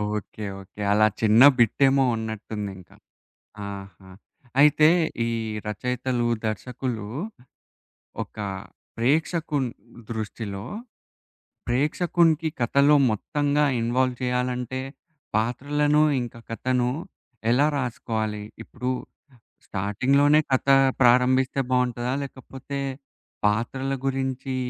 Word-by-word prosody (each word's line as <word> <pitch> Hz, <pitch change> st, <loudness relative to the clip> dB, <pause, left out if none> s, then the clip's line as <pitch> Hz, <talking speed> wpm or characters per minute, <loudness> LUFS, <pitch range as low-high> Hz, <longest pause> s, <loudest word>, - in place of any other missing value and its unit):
Okay. 105 Hz, +1 st, -6 dB, 0.2 s
Okay. 95 Hz, +2 st, -12 dB
అలా 110 Hz, +1 st, +5 dB
చిన్న 110 Hz, +1 st, +5 dB, 0.2 s
బిట్టేమో 135 Hz, +4 st, +4 dB
ఉన్నట్టుందింకా. 105 Hz, -4 st, -6 dB, 0.7 s
ఆహా! 95 Hz, -1 st, -9 dB, 0.5 s
అయితే 150 Hz, +1 st, +6 dB, 0.4 s
ఈ -, -, 0 dB, 0.4 s
రచయితలు, 125 Hz, +3 st, -1 dB, 0.2 s
దర్శకులు 115 Hz, 0 st, -3 dB, 1.2 s
ఒక -, -, -12 dB, 0.6 s
ప్రేక్షకుని 145 Hz, +2 st, 0 dB, 0.4 s
దృష్టిలో 105 Hz, -2 st, -5 dB, 1.0 s
ప్రేక్షకునికి 160 Hz, +4 st, +2 dB
కథలో 140 Hz, +5 st, +4 dB
మొత్తంగా 145 Hz, +6 st, 0 dB, 0.2 s
ఇన్వాల్వ్ 125 Hz, +2 st, +1 dB
చేయాలంటే 125 Hz, 0 st, -1 dB, 0.6 s
పాత్రలను 145 Hz, +6 st, +1 dB, 0.2 s
ఇంకా 120 Hz, -1 st, -8 dB
కథను. 125 Hz, +1 st, 0 dB, 0.6 s
ఎలా 135 Hz, +5 st, +4 dB
రాసుకోవాలి? 110 Hz, -4 st, -3 dB, 0.2 s
ఇప్పుడు 125 Hz, +1 st, -4 dB, 0.8 s
స్టార్టింగ్‌లోనే 135 Hz, +10 st, +2 dB
కథ 130 Hz, +1 st, +1 dB, 0.3 s
ప్రారంభిస్తే 130 Hz, +2 st, +4 dB
బావుంటదా? 125 Hz, 0 st, 0 dB
లేకపోతే 135 Hz, +1 st, -7 dB, 0.7 s
పాత్రల 120 Hz, +6 st, 0 dB
గురించి 135 Hz, 0 st, -2 dB
125 Hz, 80 wpm, -25 LUFS, 110-135 Hz, 1.2 s, అయితే